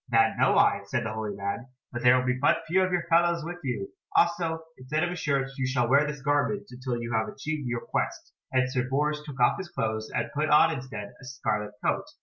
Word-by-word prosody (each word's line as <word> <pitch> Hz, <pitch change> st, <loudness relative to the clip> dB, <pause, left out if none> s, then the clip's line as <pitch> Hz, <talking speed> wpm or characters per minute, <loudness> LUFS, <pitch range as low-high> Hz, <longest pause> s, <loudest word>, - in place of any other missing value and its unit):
"That 115 Hz, -1 st, +4 dB
know -, -, +4 dB
I," -, -, +4 dB
said -, -, -2 dB
the 110 Hz, -, -3 dB
holy 110 Hz, -2 st, -4 dB
man, 100 Hz, +5 st, -4 dB, 0.2 s
"but 120 Hz, -, -4 dB
there 125 Hz, +1 st, +6 dB
will 125 Hz, -, 0 dB
be 125 Hz, -, +2 dB
but 130 Hz, +3 st, +2 dB
few 185 Hz, +4 st, +2 dB
of 185 Hz, 0 st, +1 dB
your 175 Hz, -1 st, +1 dB
fellows 170 Hz, -1 st, +2 dB
with 175 Hz, +1 st, -6 dB
you. 120 Hz, -7 st, -3 dB, 0.3 s
Also 165 Hz, -1 st, +2 dB
instead 150 Hz, +5 st, -2 dB
of 175 Hz, -, 0 dB
a -, -, -3 dB
shirt 140 Hz, -5 st, 0 dB
you 130 Hz, -, +1 dB
shall 125 Hz, -2 st, +1 dB
wear 140 Hz, +4 st, +4 dB
this 150 Hz, -2 st, -6 dB
garment 145 Hz, +9 st, +1 dB
until 125 Hz, -1 st, -3 dB
you 120 Hz, 0 st, -4 dB
have 110 Hz, 0 st, +1 dB
achieved 150 Hz, -1 st, -4 dB
your 120 Hz, -1 st, -2 dB
quest," -, -, -3 dB, 0.2 s
and 130 Hz, -1 st, +2 dB
Sir 130 Hz, -1 st, -1 dB
Bors 150 Hz, +2 st, 0 dB
took 145 Hz, -3 st, -9 dB
off 120 Hz, -, +4 dB
his 190 Hz, -2 st, -6 dB
clothes, 110 Hz, -4 st, -2 dB
and -, -, -2 dB
put 150 Hz, +1 st, 0 dB
on 160 Hz, +2 st, +6 dB
instead 130 Hz, -7 st, -7 dB
a -, -, -13 dB
scarlet 105 Hz, -5 st, -2 dB
coat. -, -, +1 dB
130 Hz, 235 wpm, -27 LUFS, 120-155 Hz, 0.3 s, there